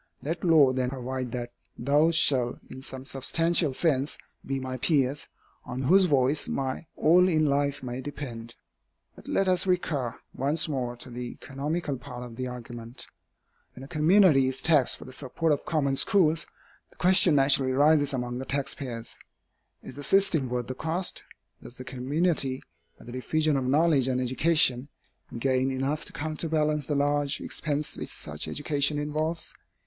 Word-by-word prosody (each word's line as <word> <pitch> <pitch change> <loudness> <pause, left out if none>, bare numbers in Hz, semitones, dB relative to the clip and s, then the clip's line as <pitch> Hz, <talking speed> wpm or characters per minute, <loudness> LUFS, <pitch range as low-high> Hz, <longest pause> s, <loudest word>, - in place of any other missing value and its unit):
Let 165 +4 -4
law 155 -7 +5
then 130 -1 -1
provide 130 -1 -4
that 120 -1 -4 0.3
those 150 +6 +3
shall, 125 -6 +3
in 130 - -9
some 130 0 -7
substantial 160 +4 +1
sense, 140 0 0 0.3
be 135 0 -3
my 130 0 -5
peers, 140 0 +1 0.4
on 125 +1 -5
whose 185 +8 +5
voice 140 -2 +2
my 135 +4 -3
all 180 +4 +5
in 155 -3 +2
life 140 -1 0
may 125 +1 -5
depend. 125 -5 -7 0.6
But - - -14
let 195 - +1
us 185 0 +2
recur 150 -9 -1 0.2
once 145 +6 +1
more 125 -5 -3
to 125 +1 -6
the 120 0 -6
economical 145 +1 -3
part 125 -1 -8
of 120 -2 -9
the 130 +1 -4
argument. 120 -1 -8 0.7
When 130 - -10
a - - -9
community 155 -3 +4
is 130 0 -2
taxed 150 -6 +3
for - - -11
the 130 - -11
support 150 +5 -2
of 145 - -1
common 140 -4 +1
schools, 165 -2 +3 0.4
the - - -24
question 185 -3 +4
naturally 135 -1 +4
rises 145 +1 +3
among 125 -2 -3
the 135 - -5
taxpayers, 135 -4 -4 0.6
Is 130 - -10
the 145 - -7
system 170 -7 +3
worth 125 0 -2
the 130 - -5
cost? 165 +7 -1 0.4
Does 125 - -11
the 130 - -7
community, 135 +1 -1 0.3
by - - -16
the 120 - -9
diffusion 155 +4 0
of 135 -2 -1
knowledge 145 0 +3
and 130 -1 0
education, 130 0 +2 0.5
gain 130 +1 +1
enough 135 +3 -2
to - - -5
counterbalance 155 -1 -1
the 150 - -1
large 145 0 0
expense 150 0 -3
which - - -6
such 75 0 -5
education 145 0 0
involves? 155 +3 -2
140 Hz, 165 wpm, -27 LUFS, 130-155 Hz, 0.7 s, law